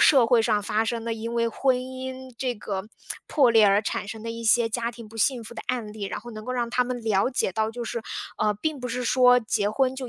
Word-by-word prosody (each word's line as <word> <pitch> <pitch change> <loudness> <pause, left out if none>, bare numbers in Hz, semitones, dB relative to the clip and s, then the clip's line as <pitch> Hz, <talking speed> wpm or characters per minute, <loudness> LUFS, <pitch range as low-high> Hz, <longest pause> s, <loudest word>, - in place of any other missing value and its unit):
社 265 -6 +6
会 230 -1 +4
上 215 -2 +2
发 215 +1 +1
生 230 0 -2
的， 230 - -1
因 230 +1 -5
为 230 0 +2
婚 260 +3 +2
姻 260 0 -6
这 250 -1 -1
个 195 -2 -4 0.4
破 270 -5 +4
裂 225 -2 +6
而 200 +1 +5
产 210 - -3
生 220 0 -7
的 230 - -3
一 230 0 -6
些 225 +1 +4
家 235 +1 -1
庭 230 -2 -11
不 225 - -13
幸 240 +2 +1
福 235 +2 -10
的 - - -6
案 230 -4 -2
例。 215 - -9
然 - - -4
后 240 +2 -10
能 215 0 -8
够 255 - -3
让 240 -2 -1
他 250 - +2
们 245 0 -4
了 210 -1 +2
解 220 - 0
到 220 +2 0
就 240 +1 -5
是， 230 0 -4 0.4
呃， 215 0 +2
并 290 +6 -3
不 250 - -4
是 250 +1 -3
说 250 0 +6
结 215 -2 0
婚 260 +4 +1
就 260 -1 -5
230 Hz, 285 characters per minute, -25 LUFS, 220-250 Hz, 0.4 s, 社